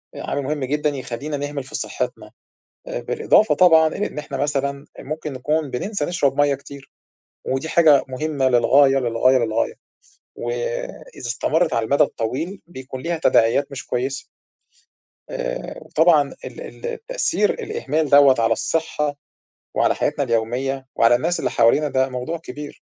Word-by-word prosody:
آآ - - -6
عامل 140 - -2
مُهم 145 0 -2
جدًا 150 +2 0
يخلّينا 140 +2 -5
نهمل 145 -1 -4
في 140 +4 -9
صحتنا. - - -4 0.6
آآ - - -3
بالإضافة 445 - +3
طبعًا 160 -3 +6
إلى 205 +6 -2
إن - - -12
إحنا 140 -2 -6
مثلًا 140 0 -1
ممكن 155 +1 -5
نكون 150 +3 -1
بننسى 200 - -2
نشرب 145 -6 0
مَيَّه 145 -1 +3
كتير 140 0 -13 0.5
ودي 135 +5 -2
حاجة 155 -5 +5
مُهمة 135 0 0
للغاية 135 +3 +5
للغاية 125 +2 +3
للغاية، 115 -1 0 0.6
وإذا - - -5
استمرت 155 +7 +1
على 115 - 0
المدى 140 +5 +4
الطويل 150 - -3
بيكون 130 -4 -8
ليها 170 0 -2
تداعيات 130 +6 +3
مش 135 - -7
كويسة. 130 +3 -2 1.0
آآ - - -5
وطبعًا 155 -3 +3
ال - - -9
ال - - -9
التأثير 480 +1 0
الإهمال 435 - -2
دوّة 140 -2 +7
على 115 0 +3
الصحة 150 0 -1 0.6
وعلى - - +2
حياتنا 145 -1 0
اليومية 130 +3 -1
وعلى 115 +1 +5
الناس 165 +8 0
اللي - - -1
حوالينا 120 +6 +3
ده 130 0 +1
موضوع 125 +7 -4
كبير. 150 -2 -9
145 Hz, 145 wpm, -21 LUFS, 130-160 Hz, 1.0 s, دوّة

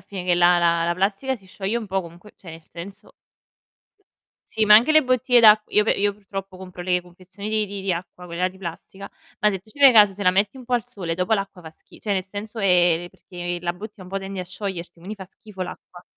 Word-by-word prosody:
finire 185 -1 -7
che 175 - +3
la 175 0 +5
la 170 -1 +2
la 170 - +1
plastica 200 +8 -1
si 195 -6 -15
scioglie 195 +4 -3
un 220 - -7
po' 190 0 -1
comunque, 175 +5 -14
cioè 175 - -12
nel 160 0 -12
senso 195 +5 -11 1.4
Sì, 220 - +2
ma 210 - +8
anche 235 +8 +6
le 310 -2 +5
bottiglie 255 0 +3
d'acq 215 -2 +7
io 210 - +3
pe - - +3
io 205 0 +1
purtroppo 195 -1 -8
compro 185 -1 -9
le 180 0 +1
confezioni 185 +3 -10
di 215 -1 0
di 200 -1 -7
di 190 - 0
acqua, 180 +1 -7
quella 175 +2 -1
di 190 +1 -16
plastica, 190 +2 -8 0.3
ma 210 - +3
se 195 -3 -2
tu 215 - -22
ci 285 - -18
fai 275 -2 +8
caso 210 -3 +7
se 200 +1 -6
la 180 - +5
metti 200 +6 +1
un 255 - -11
po' 250 - -7
al 240 -2 +2
sole 170 -4 -5
dopo 180 +5 +1
l'acqua 195 -3 -5
fa 160 - -10
schi 160 - -19
cioè 210 - -2
nel 190 -2 -1
senso 210 +3 -7
ehm, 175 -3 +3
perché 175 -1 -6
la 175 0 -2
bottiglia 205 +2 -10
un 180 - -12
po' 195 +1 -3
tende 195 -1 -6
a - - -5
sciogliersi, 185 -2 -6
quindi 185 +5 -8
fa 195 - -9
schifo 200 -3 -9
l'acqua. 180 0 -10
190 Hz, 250 wpm, -23 LUFS, 180-210 Hz, 1.4 s, ma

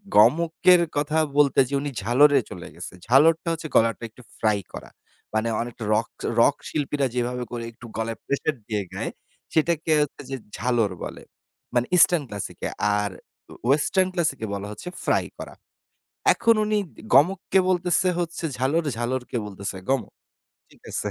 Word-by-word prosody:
গমকের 170 - +5 0.2
কথা 150 +2 0 0.2
বলতে 140 -2 +4
যেয়ে 140 0 0
উনি 145 - -3
ঝালরে 140 +6 +5
চলে 90 -1 -8
গেছে। 90 +2 -8
ঝালরটা 160 +7 +4
হচ্ছে 160 -1 -5
গলাটা 115 +1 +3
একটু 125 - -17 0.2
ফ্রাই 105 -2 +2
করা। - - -8 0.4
মানে 110 +1 +1
অনেক 120 0 -6 0.2
রক 110 +2 +1 0.3
রক - - +5
শিল্পীরা 145 -2 -1
যেভাবে 125 0 -1
করে 120 -1 -4
একটু 115 +1 -14
গলায় 115 0 -2
প্রেশার 140 +2 -1
দিয়ে 105 -2 -1
গায় - - -3 0.4
সেটাকে 160 0 +1
হচ্ছে 150 - -3
যে 135 - -2 0.2
ঝালর 115 -3 +1
বলে। - - -7 0.5
মানে 120 0 +2
ইস্টার্ন 170 -3 +5
ক্লাসিকে। 105 -1 -5 0.3
আর 105 -1 -2 0.6
ওয়েসটার্ন 185 +7 +3
ক্লাসিকে 155 -10 -1
বলা 100 0 -4
হচ্ছে 105 - -7
ফ্রাই - - +2
করা। - - -8 0.8
এখন 230 -1 +3
উনি 210 0 +1 0.4
গমককে 185 +7 +4
বলতেছে 180 0 +2
হচ্ছে 170 -1 -3
ঝালর। 145 +6 +1
ঝালরকে 125 +1 -3
বলতেছে 100 -1 -6
গমক। 135 -2 0 0.6
ঠিক - - -22
আছে? - - -2
135 Hz, 150 wpm, -24 LUFS, 115-165 Hz, 0.8 s, গমকের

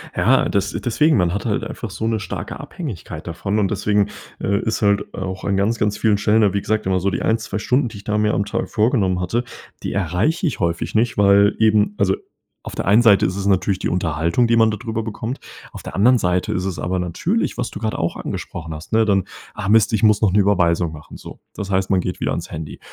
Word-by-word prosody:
Ja, - - +3
das - - 0
deswegen 150 +6 +2
man 90 -2 +1
hat 100 - -3
halt 105 -3 0
einfach 115 - -6
so 105 +4 -4
'ne 115 -1 0
starke 95 -4 -6
Abhängigkeit 90 - -7
davon 95 +5 -2
und 100 -2 +1
deswegen, 105 0 +1 0.3
äh, 100 +1 +1
ist 110 - -2
halt 100 -1 +1
auch 95 -1 -5
an 100 -1 0
ganz, 105 +4 +1
ganz 105 -1 0
vielen 110 -2 +2
Stellen 105 +2 +3
da 100 -3 +3
wie 100 - 0
gesagt 110 +1 -1
immer 95 0 +1
so 95 +2 0
die 85 - -3
1, 110 - +2
2 105 -2 -5
Stunden 125 +3 +1
die 105 - -10
ich 100 - -11
da 105 +2 -1
mir 105 0 +2
am 100 - 0
Tag 115 +3 -3
vorgenommen 105 -5 +1
hatte 115 +7 -1 0.4
die - - -3
erreiche 100 - 0
ich 145 - -3
häufig 85 +1 -2
nicht 115 +2 +1
weil 100 0 +5
eben 105 -2 +3
also 95 -1 +2 0.5
auf - - -8
der - - -3
einen 105 +5 +5
Seite 105 -4 +5
ist 95 - -2
es 100 - -3
natürlich 95 0 +1
die - - -1
Unterhaltung, 85 +5 +1
die 115 0 +3
man 110 -1 +5
da 110 - -1
drüber 115 0 -4
bekommt. 115 +3 -5 0.3
Auf - - -9
der - - -8
anderen 125 +6 +5
Seite 90 -3 0
ist 90 - -2
es 95 -3 -3
aber 90 +1 -2
natürlich, 160 - -1
was 125 -1 -3
du - - -7
grad 110 -1 -2
auch 85 - -2
angesprochen 80 -2 -6
hast, 75 +2 -11
ne, 110 0 +3
dann: 100 -3 +2 0.3
„Ah 105 -2 -4
Mist, 110 0 +4
ich 110 - +1
muss 105 -1 +4
noch 100 -4 +3
'ne 105 - +4
Überweisung 90 -4 +2
machen“, 75 -1 -11
so. - - -11 0.2
Das 100 -1 -5
heißt, 95 0 +1
man 95 -2 +2
geht 90 - -4
wieder - - -1
ans - - -4
Handy 75 -1 -7
100 Hz, 245 wpm, -20 LUFS, 95-110 Hz, 0.5 s, weil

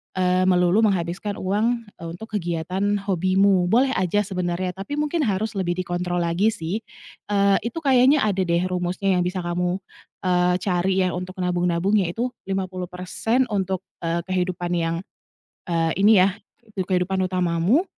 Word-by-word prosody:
eee, 185 0 +2
melulu 180 +2 +4
menghabiskan 190 +2 -2
uang, 220 +6 0 0.2
eee, 165 - -6
untuk 220 +5 -10
kegiatan 175 -2 -2 0.2
hobimu. 190 0 +2
Boleh 255 +7 +3
aja 190 +3 +1
sebenarnya, 180 -2 -2
tapi 195 +10 -6
mungkin 300 +3 -1
harus 210 +2 -1
lebih 185 -4 -1
dikontrol 175 -1 -2
lagi 170 +5 +1
sih, 210 -2 -2 0.5
eee, 200 -1 +3
itu 240 +8 -5
kayaknya 270 +1 +5
ada 200 -3 0
deh 170 +1 +2
rumusnya 185 +1 0
yang - - +2
bisa 180 0 -3
kamu, 180 +2 -1 0.4
eee, 180 -1 +2
cari 190 0 +1
ya, 185 - +1
untuk 180 +1 -5
nabung 180 0 0
nabung 180 +5 +2
yaitu 215 +7 -1 0.2
50% 185 +5 -1
untuk, 190 -2 -1 0.2
eee, 170 0 -2
kehidupan 180 -1 -2
yang, 165 -1 0 0.7
eee, 165 -1 +1
ini 210 +1 +6
ya, 185 +1 +4 0.4
tuk 190 -2 -3
kehidupan 185 +1 +1
utamamu, 180 - +2
185 Hz, 150 wpm, -23 LUFS, 175-200 Hz, 0.7 s, ini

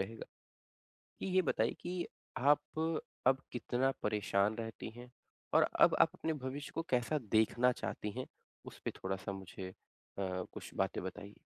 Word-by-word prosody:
रहेगा, - - -4 0.9
कि - - -2
ये 185 0 +4
बताइए 115 -6 +2
कि 175 0 -2 0.3
आप 145 +3 +6 0.7
अब 135 0 +5
कितना 125 +2 +1
परेशान 105 0 +2
रहती 115 -1 -5
हैं 125 0 -10 0.4
और - - +7 0.2
अब - - +8
आप 165 - +7
अपने 160 -3 -1
भविष्य 140 +2 -4
को 165 - 0
कैसा 125 +5 +2 0.2
देखना 120 +3 +5
चाहती 105 -3 -3
हैं, 130 - -2 0.4
उसपे - - -5
थोड़ा-सा 95 +1 -2
मुझे 95 -1 -6 0.5
अ, 95 -2 -1
कुछ - - -7
बातें - - +1
बताइए? 100 +2 -6
120 Hz, 145 wpm, -35 LUFS, 100-140 Hz, 0.9 s, अब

